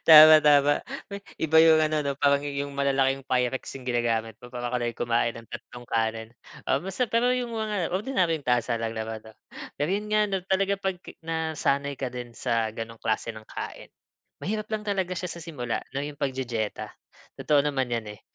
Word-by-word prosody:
Tama, 155 0 +11
tama. 145 -1 +5 0.3
We 200 - -5 0.2
iba 160 0 +4
yung 160 -1 +7
ano, 155 0 +1
'no, 140 -1 -1
parang 140 0 +3
yu 140 -1 -3
yung 140 - -8
malalaking 135 -1 +1
Pyrex 130 +1 -1
yung 130 - -10
ginagamit 115 -3 0
ko. 125 - -11
Para 120 -1 -5
ka 125 - 0
din 120 -1 -2
kumain 115 0 0
ng 115 - -10
tatlong 120 0 -9
kanin. 110 -1 -1 0.4
Ah 135 - +1
mas 190 +3 -6
sap 250 -3 0
pero 235 +2 +3
yung 250 -1 0
mga 210 -6 -2
ordinaryong 185 - 0
tasa 120 -1 +1
lang 115 0 -3
naman, 110 0 -4
'no? 110 0 -16 0.4
Pero 145 +2 -1
'yon 210 +1 -2
nga, 215 0 +3
no, 190 - +1
talaga 195 +1 +2
'pag 190 -2 -1 0.2
nasanay 160 -3 -1
ka 130 - -1
din 125 -1 -7
sa 115 -1 -1
gano'ng 115 0 -7
klase 110 +1 -1
ng 110 - -10
kain, - - -8 0.5
mahirap 215 +2 -2
lang 215 -1 -2
talaga 190 -2 0
siya 180 0 -3
sa 170 0 -7
simula, 125 -9 -3
'no, 135 - -2
yung 145 0 -5
pagdidiyeta. 130 -6 -3 0.5
Totoo 150 -2 +4
naman 135 -4 -1
yan, 115 -2 -2
eh, - - -23
140 Hz, 195 wpm, -26 LUFS, 120-165 Hz, 0.5 s, Tama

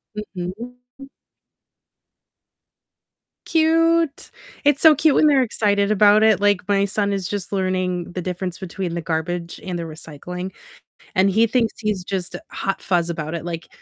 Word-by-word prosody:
Mhm, 185 -4 -5 0.5
mm. 275 0 -11 2.4
Cute, 330 -1 +2 0.3
it's 285 -1 +3
so 320 -1 +8
cute 305 0 +3
when - - +5
they're 280 -3 +5
excited 205 -3 +1
about 210 +1 +5
it, 220 -4 +4
like, 205 -2 +3
my 200 -1 +3
son 200 0 -1
is 195 -2 -2
just 200 0 -4
learning 185 -2 -1
the 180 - -4
difference 180 0 -4
between 185 -2 -5
the 170 - -2
garbage 170 +1 -3
and 185 -2 -4
the 170 - -3
recycling, 165 +3 -7 0.6
and 190 +1 +4
he 220 +4 +3
thinks 230 -1 +1
he's 210 -4 -2
just 180 -2 -4
a - - -7
hot 195 0 -3
fuzz 175 -2 0
about 160 -1 -4
it, 170 -1 -5
like, 170 -1 -5
190 Hz, 155 wpm, -21 LUFS, 175-215 Hz, 2.4 s, so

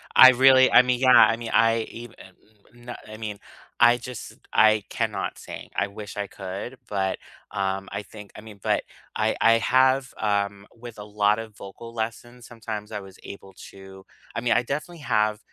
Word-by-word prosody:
I 130 - +10
really 130 +1 +5
I 125 - +8
mean, 125 -1 -1
yeah, 130 -1 +3
I 115 - +6
mean 120 -1 -7
I 115 0 +3
even 120 -1 -11 0.6
n 120 0 -10
I 110 0 -10
mean, 105 -2 -6 0.4
I 120 0 +6
just 125 -1 -9 0.2
I 110 -1 +4
cannot 105 -5 -3
sing. - - -10
I - - 0
wish 105 0 -10
I 100 -1 -3
could, 100 +8 -8
but, 95 -2 -1 0.3
um, 95 0 -3
I 100 +1 -5
think 105 -1 -13
I 105 - -10
mean 105 -2 -13
but - - 0 0.3
I - - 0
I 115 - +5
have, 130 +1 +2
um, 100 -1 -2
with 115 -1 -11
a - - -7
lot 105 +1 +1
of 110 -2 -9
vocal 115 +4 -11
lessons, 120 +2 -6
sometimes 110 -2 -7
I 105 - -4
was 95 -1 -13
able 95 -1 -11 0.2
to 95 0 -14 0.3
I 115 - -2
mean, 120 - +2
I 120 - +2
definitely 155 +6 -5
have, 110 -5 0
110 Hz, 185 wpm, -24 LUFS, 100-120 Hz, 0.6 s, I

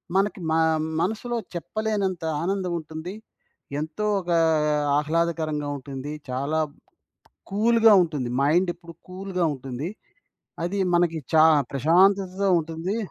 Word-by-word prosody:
మనకి 195 0 +1
మ - - +1 0.5
మనసులో 225 +5 -2 0.2
చెప్పలేనంత 200 -1 -2 0.2
ఆనందం 185 0 -1
ఉంటుంది. 160 +4 -7 0.7
ఎంతో 160 +7 -3
ఒకా 175 -2 0 0.6
ఆహ్లాదకరంగా 155 -1 -1
ఉంటుంది, 140 +2 -7 0.2
చాలా 140 +5 -1 0.9
కూల్‌గా 225 +2 +5
ఉంటుంది, 150 -7 -3
మైండెప్పుడు 170 +2 0
కూల్‌గా 185 -1 -3
ఉంటుంది, 135 +4 -5 0.7
అది 195 +3 -2 0.2
మనకి 170 -2 +2
చా 155 -1 +7 0.3
ప్రశాంతతతో 185 +7 +3
ఉంటుందీ 165 +6 -3
170 Hz, 95 wpm, -25 LUFS, 155-195 Hz, 0.9 s, చా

